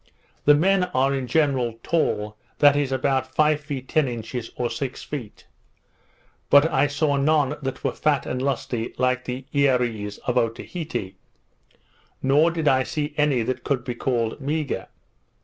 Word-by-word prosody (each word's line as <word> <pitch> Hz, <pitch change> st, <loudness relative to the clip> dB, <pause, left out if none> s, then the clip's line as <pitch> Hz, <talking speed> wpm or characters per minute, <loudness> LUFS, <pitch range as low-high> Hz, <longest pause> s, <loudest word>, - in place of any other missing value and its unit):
The 145 Hz, -, +7 dB
men 185 Hz, +4 st, +3 dB
are 135 Hz, +2 st, +3 dB
in 135 Hz, -2 st, -2 dB
general 130 Hz, -5 st, +1 dB
tall, 105 Hz, -10 st, 0 dB, 0.2 s
that 145 Hz, -1 st, +6 dB
is, 145 Hz, -2 st, 0 dB
about 130 Hz, 0 st, 0 dB
five 155 Hz, -1 st, +3 dB
feet 140 Hz, -3 st, -6 dB
ten 155 Hz, -3 st, +2 dB
inches, 120 Hz, 0 st, -5 dB
or 120 Hz, -, -1 dB
six 125 Hz, +2 st, -4 dB
feet; 125 Hz, -8 st, -7 dB, 1.0 s
but 145 Hz, +2 st, +7 dB
I 135 Hz, +2 st, +3 dB
saw 145 Hz, 0 st, 0 dB
none 145 Hz, 0 st, +2 dB
that 135 Hz, -1 st, -5 dB
were -, -, +1 dB
fat 145 Hz, -4 st, 0 dB
and 125 Hz, +1 st, -3 dB
lusty 125 Hz, -3 st, -2 dB
like 130 Hz, 0 st, +1 dB
the 125 Hz, +1 st, -5 dB
Earees 125 Hz, -7 st, +1 dB
of 125 Hz, 0 st, +2 dB
Otaheite; 115 Hz, -, -4 dB, 1.1 s
nor 145 Hz, +5 st, +4 dB
did 165 Hz, -2 st, -2 dB
I 130 Hz, -1 st, +4 dB
see 150 Hz, +2 st, -3 dB
any 145 Hz, -5 st, +2 dB
that 130 Hz, +2 st, -3 dB
could 135 Hz, -4 st, -1 dB
be 125 Hz, -, -3 dB
called 120 Hz, 0 st, -1 dB
meagre. 150 Hz, +1 st, -2 dB
135 Hz, 155 wpm, -24 LUFS, 125-145 Hz, 1.1 s, The